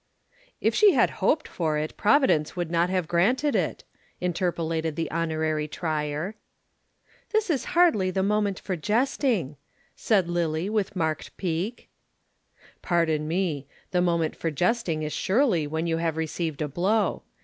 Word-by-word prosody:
"If - - +1
she 420 -2 +6
had - - +3
hoped 310 - +2
for 155 -3 -1
it, 155 +1 -3
Providence 215 - +3
would 175 -2 -3
not 170 +1 +2
have 185 -3 0
granted 235 - +2
it," 180 -6 -1 0.4
interpolated 165 -3 -1
the 165 -1 -3
Honorary 155 -1 -1
Trier. 155 +3 -3 1.0
"This 435 -4 +1
is 275 - -1
hardly 305 - +4
the 190 +1 0
moment 205 -1 +1
for 190 - -3
jesting," 210 - 0 0.4
said 195 -6 +2
Lillie, 175 +2 -1
with 210 -2 -1
marked 160 -3 -2
pique. 185 +6 -3 0.9
"Pardon 160 -3 +1
me. 160 -5 -1 0.2
The 180 - +2
moment 170 -3 +1
for 165 - -2
jesting 175 - 0
is 150 - -3
surely 190 - +2
when 160 +2 -2
you 165 -1 0
have 165 -1 -1
received 160 -1 -2
a - - -1
blow. 190 +9 0
170 Hz, 145 wpm, -26 LUFS, 160-200 Hz, 1.0 s, she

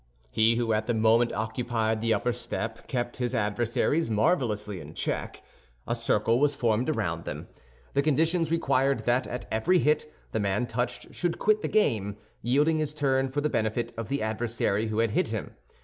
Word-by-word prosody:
He 110 - +4
who 115 -1 +1
at 110 0 0
the 120 - +1
moment 115 +2 +4
occupied 110 0 -1
the 115 0 +1
upper 110 +3 +1
step 115 -1 -5
kept 120 -2 -2
his 125 -2 -1
adversaries 115 +8 +1
marvelously 105 - +1
in 80 0 -10
check. - - -3 0.4
A - - -1
circle 115 0 +1
was 145 0 +3
formed 115 +3 +1
around 85 - -1
them. - - -6 0.4
The 140 - +3
conditions 160 +3 +2
required 140 -4 +2
that 120 +2 +1
at 125 - -5
every 170 +12 +3
hit 150 -1 +1 0.2
the 110 - -1
man 100 +3 0
touched 120 +1 -3
should 175 -1 -1
quit 215 0 +2
the - - -1
game, 105 - +1 0.2
yielding 150 +6 +2
his 150 -1 -2
turn 135 -2 +1
for 145 +3 -1
the 150 - +1
benefit 110 +2 -1
of 115 -1 -5
the 140 -2 -1
adversary 110 -1 -1
who 110 0 -3
had 115 -1 +2
hit - - +1
him. - - -5
120 Hz, 180 wpm, -27 LUFS, 110-140 Hz, 0.4 s, He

